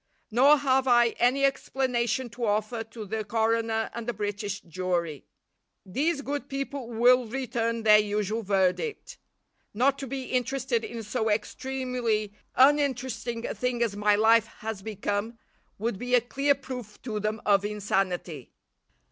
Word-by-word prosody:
Nor 275 +6 +6
have 265 -1 +2
I 240 -1 +5
any 260 +3 +3
explanation 260 -2 0
to 240 +1 -3
offer 215 +2 -1
to 225 -1 -9
the 215 +2 -3
coroner 225 +1 0
and 235 -1 -6
the 240 - -1
British 205 -1 -3
jury. 170 -4 -3 0.6
These 280 - -1
good 285 -1 -4
people 275 -2 -4
will 245 +1 +4
return 230 -2 -2
their 210 -1 +7
usual 210 +1 -1
verdict. 195 - -1 0.6
Not 270 +5 +2
to 275 - -5
be 265 +1 -4
interested 255 -1 -1
in 230 -1 -6
so 220 +1 -1
extremely 230 -1 -1 0.2
uninteresting 260 -4 +2
a - - -3
thing 250 -1 -1
as 215 -4 -1
my 210 0 +3
life 225 +1 +4
has 220 -2 -7
become, 210 +2 -3 0.4
would 215 -1 -2
be 250 0 +1
a 245 - +5
clear 275 +4 +1
proof 250 -5 -8
to 215 -4 -3
them 215 +1 -2
of 200 -1 +4
insanity. 195 - -2
230 Hz, 145 wpm, -27 LUFS, 210-255 Hz, 0.6 s, their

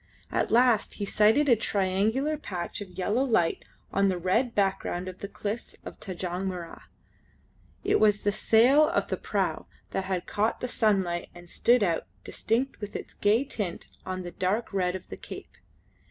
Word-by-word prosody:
At - - 0
last 240 -2 +3
he 205 - -3
sighted 215 +9 +4
a 245 - +6
triangular 215 +8 +1
patch 185 - -5
of 200 - -7
yellow 210 +7 +1
light 220 -11 +1 0.3
on 200 0 +3
the 185 - 0
red 210 +8 +1
background 190 -2 0
of 185 0 -7
the 200 - -5
cliffs 210 +3 -5
of - - -9
Tanjong 185 0 -4
Mirrah. 175 -3 -6 1.0
It - - +3
was 210 -1 +4
the 205 - +2
sail 245 +8 +5
of - - 0
the - - -1
prau - - -2 0.2
that 190 - -2
had 185 -2 -2
caught 215 +3 0
the 250 - -2
sunlight 190 -7 +1
and 175 0 -12
stood 240 +6 +3
out, 170 -4 0 0.2
distinct 245 +4 -1
with 205 0 -6
its - - -6
gay 215 +5 +3
tint, 205 -10 -4
on 185 0 -4
the 175 - -6
dark 200 +6 -1
red 180 -2 +1
of 185 - -7
the - - -7
cape. - - -10
205 Hz, 175 wpm, -28 LUFS, 185-230 Hz, 1.0 s, a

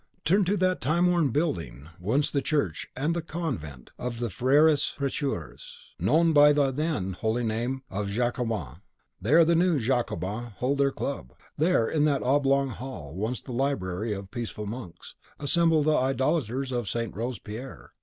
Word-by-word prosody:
Turn 190 +5 +4
to 200 +3 +1
that 185 -1 +1
time 155 +8 +2
worn 175 -5 +3
building, 85 - -2
once 135 +11 +1
the 140 - +1
church 135 - -1
and 150 +6 0
the 170 - -1
convent 125 - -5
of 125 -1 -4
the 120 -3 -2
Freres 145 - +3
Precheurs, 135 - -4 0.2
known 165 +4 +3
by 145 0 +7
the 140 -2 +2
then 140 - -1
holy 110 +5 -1
name 120 +4 -2
of 100 +1 -2
Jacobins; 115 - -2 0.4
there 155 - +5
the 170 - +3
new 170 -1 +3
Jacobins 115 -2 -2
hold 140 +3 0
their 140 0 +4
club. 135 - -5 0.2
There, 155 -7 +2
in 150 -2 +2
that 145 -3 +1
oblong 140 0 +2
hall, 115 - -7
once 110 +6 -3
the 130 - -8
library 110 -6 -1
of 100 0 -5
the 95 - -16
peaceful 115 -3 -5
monks, 105 -5 -8 0.3
assemble 160 +1 +3
the 155 +1 +3
idolaters 135 -1 0
of 120 -5 -2
St. 115 -1 -3
Robespierre. 115 - -6
130 Hz, 165 wpm, -27 LUFS, 110-150 Hz, 0.4 s, by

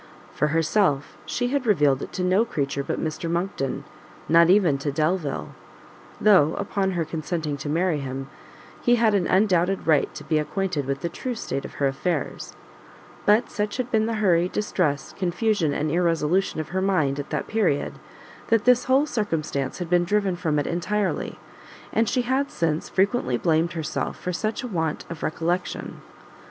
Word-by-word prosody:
For 150 - +1
herself, 155 -1 +1
she 245 0 -1
had 275 -2 -1
revealed 145 -9 +3
it - - -6
to 185 - -2
no 185 +4 +3
creature 140 -9 -2
but - - -3
Mr 160 +1 -3
Monckton; 170 -6 -2 0.4
not 170 +1 +6
even 180 -8 +4
to 145 +1 -2
Delvile; 155 - -1 0.7
though, 185 -8 +5
upon 190 -1 -1
her 170 -2 -1
consenting 155 -1 -3
to 140 +1 -5
marry 165 0 +1
him, 135 0 -5 0.5
he 240 - +4
had 225 -2 +3
an 190 -4 +2
undoubted 190 -1 +2
right 155 -3 +3
to - - -7
be 155 -1 +1
acquainted 160 -3 -2
with 140 0 -2
the 170 - -2
true 245 +8 -4
state 140 -10 -4
of - - -9
her 140 - 0
affairs; 140 +3 -2 0.7
but 215 +4 +4
such 210 +2 -2
had 250 -1 -3
been 220 -1 +2
the 230 - -1
hurry, 180 -4 +3
distress, 180 -9 -1
confusion 185 -2 0
and 145 +1 -1
irresolution 170 +1 +1
of 155 0 -4
her 190 +2 -1
mind 155 -8 +1
at 145 - -5
that - - -2
period, 185 -10 0 0.5
that 225 -2 +2
this 250 0 +5
whole 265 +3 +4
circumstance 160 - -2
had 180 - -4
been 175 +1 +3
driven 200 0 +1
from 165 -4 -1
it 145 - 0
entirely, 195 +4 -1 0.6
and 225 -1 +2
she 250 - +1
had, 265 +3 0
since, 160 -2 -1
frequently 195 - +1
blamed 165 +4 +1
herself 160 -2 -3
for 180 - -3
such 215 +7 -2
want 160 -9 -2
of 165 - -7
recollection. 175 +3 -2
175 Hz, 170 wpm, -24 LUFS, 150-205 Hz, 0.7 s, not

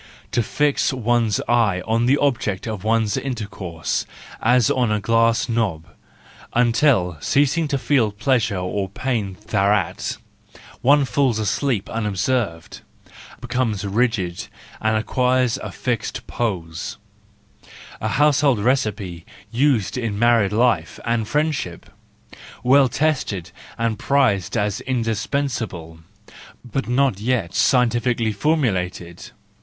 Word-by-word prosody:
To 120 - +2
fix 145 +7 +1
one's 120 -4 +1
eye 110 -6 +2
on 115 +2 +1
the 140 +3 +4
object 115 -9 0
of 105 -4 -5
one's 110 -1 +1
intercourse, 100 - -4 0.3
as 120 0 +3
on 125 -4 +1
a 105 - +1
glass 115 +2 +2
knob, 105 -9 -1 0.7
until, 115 - +3
ceas¬ 140 +1 +2
ing 165 -2 0
to 140 - 0
feel 130 -5 +2
pleasure 115 -1 0
or 95 +2 -2
pain 100 -3 -3
thereat, 100 -3 0 0.6
one 140 +2 +4
falls 130 -4 +1
asleep 105 +1 -1
unobserved, 105 -4 -2 0.6
becomes 120 -5 -1
rigid, 100 -4 -1 0.3
and 110 0 +2
acquires 125 +2 +1
a - - -6
fixed 120 -4 -3
pose: 95 -3 -3 1.0
a - - -1
household 145 -3 +3
recipe 105 -7 -1 0.3
used 125 -3 +1
in 115 -4 -2
married 115 -3 +3
life 110 -7 +1
and 115 0 +1
in 110 - -3
friendship, 145 - -2 0.7
well 135 +1 +5
tested 115 - -1 0.3
and 115 -2 -1
prized 105 -9 +1
as 105 -2 -1
indispens¬ 125 +2 -1
able, 80 -6 -7 0.7
but 130 +3 -3
not 125 -4 +1
yet 110 -6 -1
scientifically 120 -2 +2
formulated. 100 - -1
115 Hz, 115 wpm, -21 LUFS, 100-130 Hz, 1.0 s, well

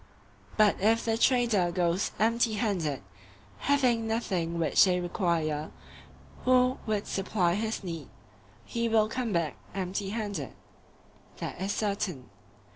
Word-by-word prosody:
But 215 -2 +5
if 225 +3 +3
the 225 -1 +1
trader 230 -7 +3
goes 175 +1 +1
empty 230 +1 +2
handed, 185 - -1 0.6
having 250 -5 +2
nothing 185 -7 -1
which 165 -1 +4
they 180 -2 +3
require 170 -4 -1 0.7
who 255 0 +3
would 210 -2 0
supply 190 -3 0
his 220 +2 -2
need, 165 -6 -6 0.6
he 235 0 -1
will 220 -1 +4
come 235 0 -2
back 170 -4 -1 0.2
empty 195 +1 -2
handed. 210 -1 -4 0.8
That - - -6
is 195 +1 -1
certain. 200 - -2
205 Hz, 120 wpm, -29 LUFS, 175-225 Hz, 0.8 s, But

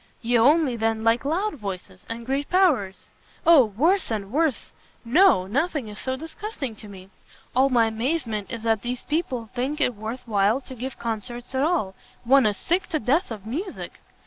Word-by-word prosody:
"You 235 +1 +3
only, 285 +1 +4
then, 225 -1 -1
like 230 +3 +2
loud 370 +9 0
voices, 190 -3 -7
and 230 0 -6
great 275 +3 -2
powers?" 285 - +2 0.4
"O 325 -7 +7
worse 310 - +1
and 210 -3 -3
worse! 305 -1 0 0.3
no, 310 - +5
nothing 275 - -1
is 210 - -9
so 260 0 -2
disgusting 310 - -6
to 210 - -11
me. 190 -1 -12 0.4
All 265 +2 +4
my 240 -3 +4
amazement 225 -2 -2
is 230 -1 -6
that 225 -2 +1
these 245 +1 -4
people 255 - -2
think 270 +5 -2
it 250 - +2
worth 220 +4 -6
while 210 +2 +2
to 260 - -11
give 255 +1 -6
Concerts 235 +2 -5
at 260 - 0
all; 295 - +1 0.3
one 260 0 +5
is 205 -1 -1
sick 350 +1 0
to 310 - -1
death 290 - +1
of 215 -4 -7
music." 335 - -6
245 Hz, 180 wpm, -24 LUFS, 220-300 Hz, 0.4 s, O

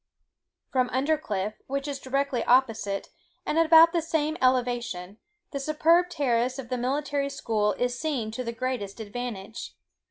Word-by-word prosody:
From 255 -2 +2
Undercliff, 255 -8 -1
which 275 +1 -2
is 280 -2 -4
directly 275 -2 -1
opposite, 225 -6 +2 0.4
and 320 - +1
about 330 0 +8
at - - -20
the 340 - +2
same 310 -1 -1
elevation, 240 -7 0 0.3
the 280 - -3
superb 325 +5 +3
terrace 255 -5 0
of 255 -3 -7
the 255 - -1
Military 280 +2 -1
School 220 -6 0
is 245 0 -2
seen 270 -9 -2
to 255 +3 -4
the 235 - -3
greatest 235 -4 -4
advantage. 220 -1 -6
255 Hz, 150 wpm, -27 LUFS, 230-290 Hz, 0.4 s, about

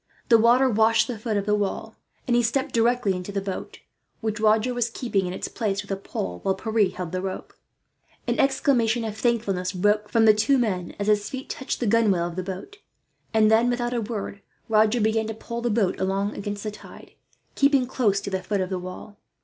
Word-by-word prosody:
The 230 -2 +7
water 240 +4 +5
washed 225 -1 +3
the 240 -4 -5
foot 215 -1 -1
of 200 - -1
the 210 - +1
wall, 205 -2 -2 0.3
and 240 - +1
he 240 - +4
stepped 260 +4 -1
directly 230 -3 +2
into 180 +2 -5
the 200 - -1
boat; 195 -1 -6 0.4
which 220 -1 -3
Roger 220 +3 +3
was 240 -1 0
keeping 210 -6 -1
in - - -3
its - - -4
place 205 -3 -2
with 200 - -10
a - - +1
pole, 90 - -5
while 190 - 0
Pierre 215 -1 +1
held 180 -2 -6
the 185 0 -2
rope. 190 0 -6 0.7
An - - -1
exclamation 255 -4 +2
of 220 -2 -4
thankfulness 210 -6 0
broke 210 +3 +1
from 225 0 +3
the 215 - +8
two 270 +6 +2
men, 190 -8 -1
as 205 - -2
his 210 -1 +2
feet 265 0 -7
touched 265 - -4
the 245 - -1
gunwale 205 -5 +3
of 175 -1 -5
the 185 - -2
boat; 190 - -7 0.5
and 215 -1 +4
then, 230 +2 +4
without 245 0 -1
a 240 - 0
word, 205 -2 -5 0.3
Roger 220 +2 +3
began 220 0 +1
to 220 - -4
pole 235 +1 -6
the 240 - 0
boat 210 -4 +1
along 195 +2 -1
against 205 0 -5
the 215 - -3
tide, 210 - -13 0.4
keeping 280 -2 +3
close 225 -6 +1
to 200 - -5
the 190 0 -1
foot 200 +2 -2
of 185 0 -3
the 185 - -1
wall. 185 +3 -9
215 Hz, 220 wpm, -24 LUFS, 195-235 Hz, 0.7 s, the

